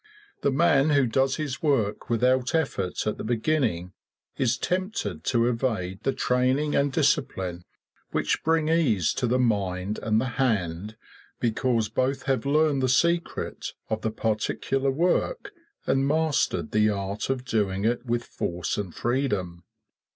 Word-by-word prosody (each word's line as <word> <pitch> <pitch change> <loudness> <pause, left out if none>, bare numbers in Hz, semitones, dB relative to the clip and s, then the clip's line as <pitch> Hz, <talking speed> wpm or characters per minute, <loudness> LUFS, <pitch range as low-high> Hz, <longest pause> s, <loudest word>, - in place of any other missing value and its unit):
The - - +2
man 145 0 +3
who 140 -3 +4
does 130 +3 +1
his 150 -2 -4
work 115 -9 0
without 125 +3 +2
effort 115 - -1
at 105 - -2
the - - -4
beginning 110 - 0 0.4
is 125 -1 +1
tempted 180 - -2
to 120 -2 +2
evade 110 -6 -1
the 135 - +1
training 130 +4 +1
and 140 0 +2
discipline 130 - 0 0.4
which - - -1
bring 160 -1 +2
ease 135 - +2
to 125 - -1
the 125 +2 +2
mind 100 -4 0
and 110 -1 +2
the 115 - 0 0.2
hand 105 -3 -1 0.4
because 115 -1 +1
both 130 +4 -1
have 135 -2 0
learned 150 -1 +3
the 130 - +1
secret 170 +6 0 0.2
of 110 0 -1
the 110 - 0
particular 110 +5 -1
work 175 - 0 0.3
and 135 0 +2
mastered 150 - +1
the 105 0 +3
art 100 +2 -3
of 130 -1 -2
doing 105 -5 0
it 120 +1 +1
with 120 -1 -1
force 90 -1 -3
and 95 -5 -5
freedom. 105 -10 -1
125 Hz, 145 wpm, -26 LUFS, 105-140 Hz, 0.4 s, who